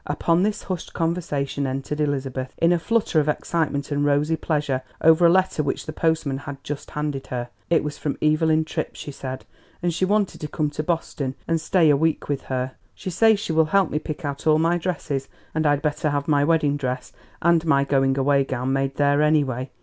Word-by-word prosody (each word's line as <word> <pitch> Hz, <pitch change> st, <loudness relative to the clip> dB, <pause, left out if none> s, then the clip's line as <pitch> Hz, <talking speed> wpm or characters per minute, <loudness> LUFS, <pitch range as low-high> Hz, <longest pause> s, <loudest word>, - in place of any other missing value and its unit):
Upon 165 Hz, +4 st, +1 dB
this 210 Hz, +2 st, 0 dB
hushed 185 Hz, -3 st, -5 dB
conversation 155 Hz, -5 st, -1 dB
entered 135 Hz, +3 st, -3 dB
Elizabeth 135 Hz, -3 st, -2 dB
in 165 Hz, +1 st, +3 dB
a 175 Hz, -, +3 dB
flutter 220 Hz, -2 st, +1 dB
of 150 Hz, 0 st, +1 dB
excitement 150 Hz, -2 st, -1 dB
and 145 Hz, 0 st, +1 dB
rosy 145 Hz, +2 st, +2 dB
pleasure 150 Hz, -4 st, -1 dB, 0.2 s
over 160 Hz, +2 st, +6 dB
a -, -, +5 dB
letter 185 Hz, -3 st, +2 dB
which 140 Hz, -2 st, -2 dB
the 155 Hz, -, -6 dB
postman 160 Hz, -4 st, 0 dB
had 140 Hz, -1 st, -8 dB
just 145 Hz, 0 st, -6 dB
handed 150 Hz, -3 st, -3 dB
her. 120 Hz, -1 st, -4 dB, 0.2 s
"It 165 Hz, -2 st, +3 dB
is 150 Hz, 0 st, -5 dB
from 145 Hz, -, -2 dB
Evelyn 155 Hz, +1 st, +2 dB
Tripp," -, -, -4 dB
she 145 Hz, -, -7 dB
said, 130 Hz, -1 st, -7 dB, 0.4 s
"and 175 Hz, -1 st, +1 dB
she 180 Hz, -, -2 dB
wants 205 Hz, +1 st, +2 dB
me -, -, -13 dB
to 150 Hz, -, -4 dB
come 150 Hz, 0 st, -1 dB
to 150 Hz, -, -3 dB
Boston 155 Hz, -5 st, -2 dB
and 165 Hz, -1 st, +1 dB
stay 165 Hz, -4 st, +4 dB
a -, -, +5 dB
week 160 Hz, +1 st, 0 dB
with 140 Hz, -2 st, -2 dB
her; 130 Hz, 0 st, -2 dB, 0.2 s
she 185 Hz, -, -5 dB
says 220 Hz, +3 st, +4 dB
she 175 Hz, -, -3 dB
will 160 Hz, 0 st, +4 dB
help 190 Hz, +2 st, +2 dB
me 150 Hz, -, 0 dB
pick 155 Hz, +1 st, -6 dB
out 140 Hz, +2 st, -4 dB
all 155 Hz, 0 st, +5 dB
my 165 Hz, +2 st, +2 dB
dresses, 150 Hz, -6 st, -3 dB, 0.3 s
and 155 Hz, -1 st, +1 dB
I'd 145 Hz, -1 st, +2 dB
better 150 Hz, +1 st, 0 dB
have 145 Hz, -1 st, -1 dB
my 145 Hz, -2 st, +3 dB
wedding 150 Hz, -2 st, +2 dB
dress 130 Hz, -2 st, -4 dB, 0.3 s
and 170 Hz, -1 st, +3 dB
my 140 Hz, -3 st, +4 dB
going 135 Hz, -1 st, +2 dB
away 140 Hz, 0 st, +3 dB
gown 130 Hz, 0 st, -2 dB
made 135 Hz, 0 st, 0 dB
there, 145 Hz, 0 st, +3 dB
anyway. 140 Hz, -4 st, +1 dB
150 Hz, 215 wpm, -23 LUFS, 140-165 Hz, 0.4 s, over